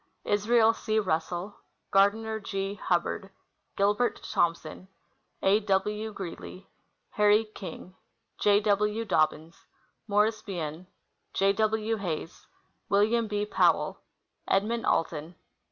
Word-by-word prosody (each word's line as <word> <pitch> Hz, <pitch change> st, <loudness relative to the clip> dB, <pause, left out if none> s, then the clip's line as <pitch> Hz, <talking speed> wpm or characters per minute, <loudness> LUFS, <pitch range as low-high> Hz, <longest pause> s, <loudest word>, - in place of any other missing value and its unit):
Israel 220 Hz, +2 st, +3 dB
C. 220 Hz, -1 st, -2 dB
Russell. 180 Hz, +1 st, -2 dB, 0.3 s
Gardiner 220 Hz, +3 st, +2 dB
G. 195 Hz, -1 st, -3 dB
Hubbard. 195 Hz, 0 st, -1 dB, 0.5 s
Gilbert 205 Hz, +4 st, +1 dB
Thompson. 170 Hz, +1 st, -1 dB, 0.6 s
A. 200 Hz, +2 st, +4 dB
W. 210 Hz, +1 st, -1 dB
Greely. 185 Hz, -1 st, -8 dB, 0.4 s
Harry 210 Hz, +1 st, +4 dB
King.. 195 Hz, -3 st, -9 dB, 0.5 s
J. 205 Hz, 0 st, +4 dB
W. 210 Hz, +2 st, +1 dB
Dobbins. 160 Hz, -3 st, -1 dB, 0.4 s
Morris 210 Hz, +1 st, +2 dB
Bien. 170 Hz, -2 st, -5 dB, 0.5 s
J. 195 Hz, +1 st, +3 dB
W. 220 Hz, +1 st, 0 dB
Hays. 170 Hz, -4 st, -5 dB, 0.4 s
Wm. 220 Hz, +3 st, +3 dB
B. 210 Hz, 0 st, -1 dB
Powell. -, -, +2 dB, 0.5 s
Edmund 225 Hz, +5 st, 0 dB
Alton. 165 Hz, +1 st, -1 dB
205 Hz, 100 wpm, -28 LUFS, 185-215 Hz, 0.6 s, A